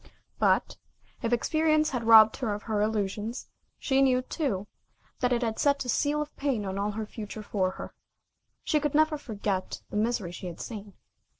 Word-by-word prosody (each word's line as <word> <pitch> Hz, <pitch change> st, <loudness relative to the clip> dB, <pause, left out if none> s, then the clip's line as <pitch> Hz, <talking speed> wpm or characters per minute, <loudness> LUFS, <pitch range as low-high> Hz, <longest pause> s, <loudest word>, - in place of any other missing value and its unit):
But, -, -, +2 dB, 0.4 s
if 230 Hz, -, -1 dB
experience 310 Hz, +5 st, +2 dB
had 245 Hz, -3 st, -3 dB
robbed 220 Hz, -1 st, +8 dB
her 225 Hz, -6 st, -1 dB
of 210 Hz, -, -8 dB
her 215 Hz, -2 st, -1 dB
illusions, 210 Hz, +2 st, -2 dB, 0.3 s
she 270 Hz, -1 st, +1 dB
knew, 255 Hz, -2 st, +3 dB
too, 250 Hz, -, -2 dB, 0.5 s
that 250 Hz, -, +1 dB
it 245 Hz, 0 st, +1 dB
had 225 Hz, -1 st, -2 dB
set 280 Hz, -2 st, +2 dB
a -, -, -5 dB
seal 295 Hz, +5 st, +1 dB
of 300 Hz, -, -15 dB
pain 265 Hz, -7 st, -1 dB
on 190 Hz, 0 st, -3 dB
all 205 Hz, +1 st, 0 dB
the 220 Hz, +1 st, -3 dB
future 215 Hz, 0 st, -7 dB
for 190 Hz, -3 st, 0 dB
her. -, -, -7 dB, 0.7 s
She 305 Hz, -, +2 dB
could 295 Hz, -1 st, -1 dB
never 310 Hz, 0 st, +4 dB
forget 205 Hz, -7 st, -3 dB
the -, -, -2 dB
misery 215 Hz, -4 st, 0 dB
she 180 Hz, +1 st, -7 dB
had 170 Hz, -, -8 dB
seen. 205 Hz, -3 st, -7 dB
225 Hz, 185 wpm, -28 LUFS, 210-275 Hz, 0.7 s, robbed